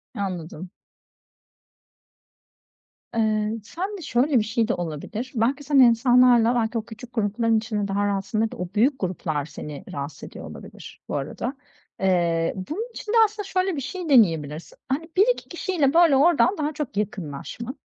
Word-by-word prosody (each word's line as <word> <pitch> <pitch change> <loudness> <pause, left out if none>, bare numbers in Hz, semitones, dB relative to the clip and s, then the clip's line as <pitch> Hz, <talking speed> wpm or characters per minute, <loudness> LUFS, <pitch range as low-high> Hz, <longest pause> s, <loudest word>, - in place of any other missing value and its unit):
Anladım. 180 -4 -5 2.5
Eee, 215 -1 +1
sende 380 - -5
şöyle 265 -1 +2
bir - - +1
şey 225 +1 0
de - - +1
olabilir, 175 - -5
belki 255 +6 +1
sen 285 -1 +3
insanlarla, 245 -1 +5
belki, 230 0 0
o 220 - -3
küçük 235 +2 -11
grupların 225 +1 +1
içinde 215 -2 -2
daha 200 +1 0
rahatsındır 205 +3 -1
da - - -9
o 180 - -3
büyük 260 +6 +3
gruplar 160 -6 -2
seni 150 0 -8
rahatsız 140 +1 -6
ediyor - - -9
olabilir - - -11
bu - - -3
arada. 150 - -3 0.5
Eee, 170 -3 +1
bunun 315 - -5
için 420 - -6
de - - +3
aslında 420 0 -5
şöyle 370 -1 0
bir 280 - -3
şey 345 +5 -5
deneyebilirsin. 165 - +2
Hani, 310 +5 -2
1-2 485 +6 +2
kişiyle, 335 -5 0
böyle, 335 -4 +6
oradan 345 +6 +4
daha 300 0 -1
çok 290 -9 -5
yakınlaşman, 210 - -5
230 Hz, 150 wpm, -24 LUFS, 190-280 Hz, 2.5 s, böyle